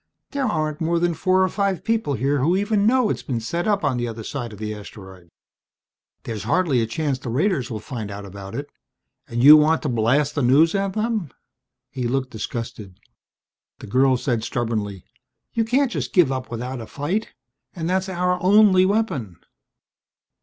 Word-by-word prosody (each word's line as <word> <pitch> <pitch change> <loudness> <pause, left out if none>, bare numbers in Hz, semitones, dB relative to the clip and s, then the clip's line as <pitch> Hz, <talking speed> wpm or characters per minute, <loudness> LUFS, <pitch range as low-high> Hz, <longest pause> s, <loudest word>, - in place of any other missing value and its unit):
There 280 -1 -1
aren't 155 -5 -2
more 170 +1 +1
than 175 0 +1
four 185 +2 +2
or - - +3
five 195 -4 -1
people 225 -11 0
here 140 +4 0
who 165 +8 +2
even 205 +1 +1
know 250 -2 +3
it's - - -3
been 125 -4 -3
set 170 - -3
up 205 -2 +1
on 130 - +1
the 120 0 -1
other 115 -1 -6
side 120 -1 -5
of 105 - -10
the 105 +1 -4
asteroid. 95 -4 -12 0.9
There's 110 -3 -5
hardly 165 -9 +2
a 115 - -1
chance 140 +2 -2
the 130 - -6
raiders 140 - 0
will 110 - -4
find 110 -2 -6
out 100 0 -7
about 100 +2 -9
it. 145 +3 -6 0.6
And 120 +1 -2
you 150 +2 +11
want 155 +2 +3
to 150 - -1
blast 125 +5 +1
the 145 - -1
news 140 +7 +4
at 195 -1 -1
them!" 215 - -1 0.6
He 125 -2 -3
looked 130 +1 -1
disgusted. 110 -4 -6 0.8
The - - -10
girl 130 +4 +3
said 120 -4 -1
stubbornly, 110 -6 -3 0.5
"You 230 - +1
can't 255 +3 +1
just - - -4
give 175 - +4
up 130 -1 -4
without 125 +2 -5
a 110 - -8
fight. 175 +10 -3 0.4
And 165 -2 -3
that's 190 +2 0
our 180 0 0
only 190 -1 +5
weapon." 185 - -1
145 Hz, 185 wpm, -22 LUFS, 115-185 Hz, 0.9 s, you